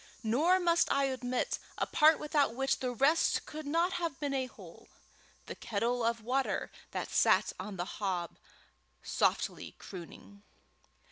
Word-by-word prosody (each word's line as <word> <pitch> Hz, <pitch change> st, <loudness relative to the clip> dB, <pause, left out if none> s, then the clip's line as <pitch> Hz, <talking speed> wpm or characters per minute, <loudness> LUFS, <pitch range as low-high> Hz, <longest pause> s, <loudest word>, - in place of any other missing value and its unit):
Nor 305 Hz, +12 st, +3 dB
must 340 Hz, -1 st, +2 dB
I 275 Hz, -1 st, +2 dB
omit 250 Hz, 0 st, -2 dB, 0.2 s
a -, -, 0 dB
part 310 Hz, +1 st, +5 dB
without 295 Hz, -5 st, +1 dB
which 270 Hz, +1 st, 0 dB
the 255 Hz, -, -1 dB
rest 275 Hz, +7 st, +2 dB
could 305 Hz, -1 st, -7 dB
not 335 Hz, +5 st, +1 dB
have 330 Hz, -5 st, -3 dB
been 285 Hz, -2 st, -2 dB
a 260 Hz, -1 st, -1 dB
whole -, -, -14 dB, 0.6 s
the -, -, -6 dB
kettle 235 Hz, +3 st, -1 dB
of 230 Hz, -1 st, 0 dB
water 260 Hz, +3 st, -1 dB, 0.2 s
that -, -, -4 dB
sat -, -, +3 dB
on 195 Hz, +1 st, -6 dB
the 175 Hz, -, -2 dB
hob, 185 Hz, -4 st, -3 dB, 0.6 s
softly -, -, -1 dB
crooning. 195 Hz, +2 st, -11 dB
260 Hz, 145 wpm, -32 LUFS, 225-300 Hz, 0.6 s, part